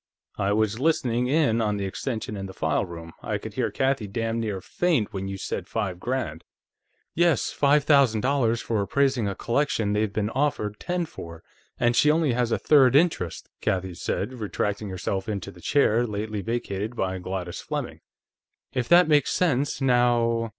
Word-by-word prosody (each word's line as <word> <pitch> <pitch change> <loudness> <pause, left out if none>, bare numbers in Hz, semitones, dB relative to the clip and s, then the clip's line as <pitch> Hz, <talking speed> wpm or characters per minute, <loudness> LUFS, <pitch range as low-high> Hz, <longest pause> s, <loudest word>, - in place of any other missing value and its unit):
I 100 0 +1
was 110 +1 +1
listening 125 -5 +1
in 130 -5 +2
on 105 -2 0
the 100 - -2
extension 110 +2 -4
in 95 -1 -5
the 95 - -11
file 80 +3 0
room; 85 -2 -9
I - - -2
could - - -8
hear - - 0
Kathie 130 -5 0
damn 115 +2 -2
near 105 -4 -2
faint 155 - 0
when 95 -1 -4
you 95 0 -4
said 95 -1 -4
five 95 -6 -3
grand." 120 - -3 0.7
"Yes; 170 -2 +2
five 145 +1 +3
thousand 140 -7 +4
dollars 125 -3 +1
for 110 -3 -1
appraising 130 +2 +1
a 100 - -3
collection 120 -5 0
they've 105 0 0
been 105 +1 -1
offered 125 -7 -1
ten 175 -1 -2
for, 85 - -10 0.4
and 120 0 +2
she 150 - +5
only 155 -4 +3
has 120 -1 0
a - - +2
third 135 -4 +5
interest," 145 - +1
Kathie 95 -1 -1
said, 95 +7 -3
retracting 105 -2 -3
herself 95 +2 -3
into 100 -3 -4
the 90 - -16
chair 120 -2 +2
lately 105 0 -3
vacated 110 0 -3
by 95 -4 -2
Gladys 90 -1 -5
Fleming. - - -4 0.7
"If 125 -1 -2
that 175 0 +7
makes 150 -3 +3
sense, 145 -5 0
now 120 -3 +2
115 Hz, 175 wpm, -25 LUFS, 100-135 Hz, 0.7 s, that